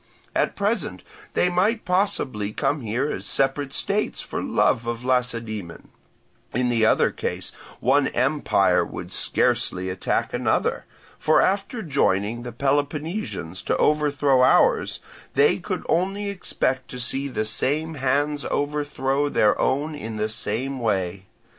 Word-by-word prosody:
At -, -, +1 dB
present 200 Hz, -, -1 dB, 0.3 s
they -, -, +3 dB
might 190 Hz, +6 st, +1 dB
possibly 160 Hz, -, 0 dB
come 145 Hz, 0 st, 0 dB
here 120 Hz, +6 st, -1 dB
as -, -, -5 dB
separate 135 Hz, +1 st, 0 dB
states 200 Hz, +8 st, 0 dB
for -, -, -4 dB
love 115 Hz, 0 st, +1 dB
of 120 Hz, +1 st, -3 dB
Lacedaemon; 115 Hz, -8 st, -2 dB, 0.7 s
in 125 Hz, 0 st, +2 dB
the 115 Hz, -2 st, +3 dB
other -, -, +3 dB
case -, -, -4 dB, 0.3 s
one 135 Hz, +3 st, +3 dB
empire 135 Hz, +4 st, +2 dB
would -, -, -7 dB
scarcely 95 Hz, +1 st, +1 dB
attack 95 Hz, -, -1 dB
another; -, -, 0 dB, 0.3 s
for 155 Hz, 0 st, +4 dB
after 200 Hz, +4 st, 0 dB
joining 120 Hz, -, +1 dB
the 120 Hz, 0 st, -6 dB
Peloponnesians 145 Hz, -, -2 dB
to -, -, 0 dB
overthrow 145 Hz, -3 st, +3 dB
ours, 125 Hz, -, +3 dB, 0.3 s
they -, -, +4 dB
could -, -, -4 dB
only 195 Hz, +4 st, 0 dB
expect 130 Hz, -8 st, -2 dB
to 125 Hz, -, -7 dB
see 135 Hz, +3 st, 0 dB
the 110 Hz, -5 st, -2 dB
same 150 Hz, +8 st, 0 dB
hands 145 Hz, +1 st, 0 dB
overthrow 145 Hz, -1 st, 0 dB
their 105 Hz, -6 st, +3 dB
own 145 Hz, +4 st, 0 dB
in 115 Hz, -7 st, -6 dB
the 110 Hz, 0 st, -1 dB
same 125 Hz, +5 st, -3 dB
way. 95 Hz, -4 st, -1 dB
135 Hz, 135 wpm, -24 LUFS, 115-150 Hz, 0.7 s, for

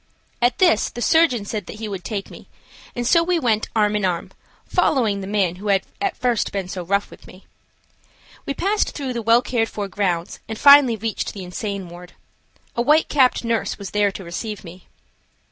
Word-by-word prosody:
At 245 Hz, +1 st, +2 dB
this 345 Hz, -, +3 dB
the -, -, -9 dB
surgeon 255 Hz, -6 st, +3 dB
said 210 Hz, -2 st, -5 dB
that -, -, -8 dB
he 220 Hz, 0 st, -6 dB
would 195 Hz, -3 st, -6 dB
take 200 Hz, -2 st, -5 dB
me, -, -, -13 dB, 0.5 s
and 240 Hz, -1 st, -3 dB
so 335 Hz, +7 st, +4 dB
we 350 Hz, +1 st, +1 dB
went 225 Hz, -8 st, 0 dB
arm 210 Hz, -1 st, +2 dB
in 210 Hz, -, -1 dB
arm, 180 Hz, -3 st, -1 dB, 0.3 s
following 235 Hz, -, +1 dB
the 190 Hz, -, -6 dB
man 195 Hz, -4 st, 0 dB
who 205 Hz, +3 st, -7 dB
had 195 Hz, -1 st, +2 dB, 0.2 s
at 395 Hz, -1 st, -1 dB
first 245 Hz, -3 st, 0 dB
been 195 Hz, -2 st, -3 dB
so 185 Hz, 0 st, -5 dB
rough 200 Hz, +3 st, -1 dB
with -, -, -15 dB
me. 185 Hz, -, -15 dB, 1.0 s
We 280 Hz, -, -2 dB
passed 405 Hz, +6 st, 0 dB
through 270 Hz, -4 st, -3 dB
the 235 Hz, -, -3 dB
well 230 Hz, +2 st, +4 dB
cared 225 Hz, -3 st, 0 dB
for 205 Hz, -1 st, -4 dB
grounds 180 Hz, -4 st, -2 dB
and 220 Hz, -, -4 dB
finally 280 Hz, -2 st, +7 dB
reached 220 Hz, 0 st, -3 dB
the 195 Hz, -, -6 dB
insane 195 Hz, +1 st, -5 dB
ward. 175 Hz, +1 st, -12 dB, 0.6 s
A 235 Hz, -, +1 dB
white 300 Hz, +6 st, +3 dB
capped 260 Hz, -4 st, +3 dB
nurse 230 Hz, -1 st, -1 dB
was 200 Hz, -3 st, -8 dB
there 205 Hz, -1 st, +2 dB
to 190 Hz, -, -8 dB
receive 205 Hz, +5 st, -6 dB
me. 180 Hz, +1 st, -13 dB
215 Hz, 200 wpm, -21 LUFS, 195-245 Hz, 1.0 s, finally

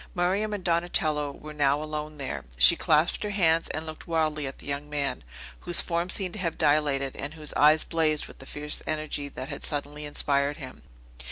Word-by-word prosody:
Miriam 190 Hz, +4 st, +1 dB
and 205 Hz, -3 st, -4 dB
Donatello 165 Hz, -4 st, +1 dB
were 150 Hz, +2 st, -10 dB
now 145 Hz, -1 st, +2 dB
alone 155 Hz, 0 st, -5 dB
there. 135 Hz, -2 st, -4 dB
She 65 Hz, +1 st, +7 dB
clasped 155 Hz, +2 st, +2 dB
her 210 Hz, -, -2 dB
hands, 165 Hz, -5 st, +2 dB
and 155 Hz, -, -3 dB
looked 155 Hz, -1 st, -8 dB
wildly 155 Hz, -3 st, 0 dB
at 135 Hz, -, -7 dB
the -, -, -13 dB
young 145 Hz, +1 st, -4 dB
man, 140 Hz, -3 st, -2 dB, 0.4 s
whose 175 Hz, -1 st, +3 dB
form 170 Hz, +1 st, -1 dB
seemed 185 Hz, -2 st, 0 dB
to 215 Hz, -, -5 dB
have 170 Hz, -3 st, -2 dB
dilated, 145 Hz, -2 st, +2 dB
and 145 Hz, +3 st, -6 dB
whose 155 Hz, -2 st, -3 dB
eyes 155 Hz, +1 st, +6 dB
blazed 155 Hz, -2 st, +1 dB
with -, -, -14 dB
the 135 Hz, -, -11 dB
fierce 150 Hz, 0 st, -4 dB
energy 155 Hz, -2 st, -2 dB
that 130 Hz, -1 st, -7 dB
had -, -, -6 dB
suddenly 150 Hz, 0 st, -3 dB
inspired 145 Hz, 0 st, 0 dB
him. 130 Hz, -5 st, -9 dB
150 Hz, 195 wpm, -27 LUFS, 145-165 Hz, 0.4 s, She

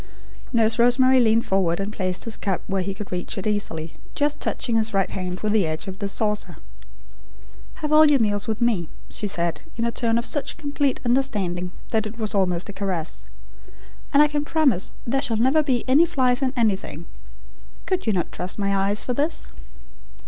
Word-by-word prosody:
Nurse 225 Hz, -1 st, +2 dB
Rosemary 255 Hz, +2 st, +5 dB
leaned 230 Hz, -1 st, +3 dB
forward 185 Hz, -3 st, +1 dB
and 200 Hz, +2 st, -3 dB
placed 185 Hz, -3 st, -2 dB
his 230 Hz, -, 0 dB
cup 195 Hz, -3 st, -2 dB
where 195 Hz, -1 st, -1 dB
he 190 Hz, +2 st, -2 dB
could 205 Hz, +1 st, -8 dB
reach 180 Hz, +4 st, -2 dB
it 195 Hz, -, -4 dB
easily, 165 Hz, -7 st, -2 dB, 0.2 s
just 295 Hz, 0 st, 0 dB
touching 235 Hz, -3 st, -1 dB
his 220 Hz, -1 st, +1 dB
right 195 Hz, -1 st, +1 dB
hand 180 Hz, -1 st, -4 dB
with 215 Hz, -1 st, 0 dB
the 205 Hz, -6 st, +3 dB
edge 155 Hz, +5 st, -3 dB
of 190 Hz, +1 st, -7 dB
the 200 Hz, -1 st, -2 dB
saucer. 210 Hz, 0 st, -1 dB, 1.2 s
"Have 305 Hz, -1 st, -3 dB
all 310 Hz, 0 st, +7 dB
your 285 Hz, -2 st, +4 dB
meals 205 Hz, -2 st, +1 dB
with 220 Hz, +1 st, -3 dB
me," 210 Hz, -9 st, +1 dB, 0.2 s
she 210 Hz, -, -2 dB
said, 170 Hz, -3 st, 0 dB
in 230 Hz, -, -1 dB
a 235 Hz, -, 0 dB
tone 230 Hz, -1 st, +1 dB
of 235 Hz, -, -1 dB
such 290 Hz, -, -1 dB
complete 285 Hz, -2 st, -1 dB
understanding, 205 Hz, -9 st, 0 dB, 0.2 s
that 220 Hz, -1 st, +1 dB
it 220 Hz, +2 st, -10 dB
was 220 Hz, -1 st, -2 dB
almost 185 Hz, -2 st, +1 dB
a 205 Hz, -, -7 dB
caress; 185 Hz, -5 st, -3 dB, 0.8 s
"and 290 Hz, +1 st, +6 dB
I -, -, +4 dB
can 295 Hz, -1 st, -2 dB
promise 295 Hz, -, +2 dB
there 270 Hz, +3 st, 0 dB
shall 240 Hz, -6 st, +2 dB
never 260 Hz, +7 st, +3 dB
be 260 Hz, -5 st, -1 dB
any 295 Hz, +7 st, +5 dB
flies 255 Hz, -3 st, +1 dB
in 260 Hz, -1 st, +1 dB
anything. 195 Hz, -7 st, -1 dB, 0.8 s
Could 370 Hz, -8 st, -2 dB
you 220 Hz, -, +3 dB
not 175 Hz, -3 st, -1 dB
trust 180 Hz, +2 st, -5 dB
my 200 Hz, -1 st, 0 dB
eyes 200 Hz, +2 st, +1 dB
for 250 Hz, -, -2 dB
this?" 295 Hz, +6 st, -2 dB
220 Hz, 195 wpm, -23 LUFS, 195-255 Hz, 1.2 s, all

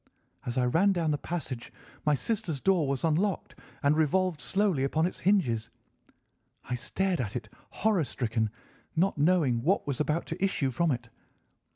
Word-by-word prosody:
As 120 Hz, +1 st, -2 dB
I 125 Hz, -, +3 dB
ran 180 Hz, +11 st, +3 dB
down 165 Hz, -4 st, 0 dB
the 145 Hz, -, +1 dB
passage, 140 Hz, -9 st, -5 dB, 0.4 s
my 150 Hz, -, +5 dB
sister's 165 Hz, -, -2 dB
door 180 Hz, -2 st, +2 dB
was 135 Hz, -1 st, -1 dB
unlocked, 170 Hz, +4 st, 0 dB, 0.3 s
and 145 Hz, +1 st, +4 dB
revolved 165 Hz, +2 st, +1 dB
slowly 190 Hz, -8 st, +1 dB
upon 155 Hz, +4 st, +1 dB
its 180 Hz, -, -3 dB
hinges. 135 Hz, -, +2 dB, 0.9 s
I -, -, -5 dB
stared 180 Hz, +7 st, -1 dB
at 110 Hz, -1 st, -4 dB
it 115 Hz, -3 st, -4 dB, 0.2 s
horror 210 Hz, -6 st, +1 dB
stricken, 115 Hz, -5 st, -1 dB, 0.5 s
not 175 Hz, -1 st, +1 dB
knowing 145 Hz, -7 st, +3 dB
what 180 Hz, +10 st, +2 dB
was 140 Hz, -3 st, -2 dB
about 150 Hz, +2 st, 0 dB
to 180 Hz, +4 st, -4 dB
issue 150 Hz, -9 st, +1 dB
from 170 Hz, +7 st, +1 dB
it. 120 Hz, -4 st, -2 dB
155 Hz, 165 wpm, -29 LUFS, 130-185 Hz, 0.9 s, my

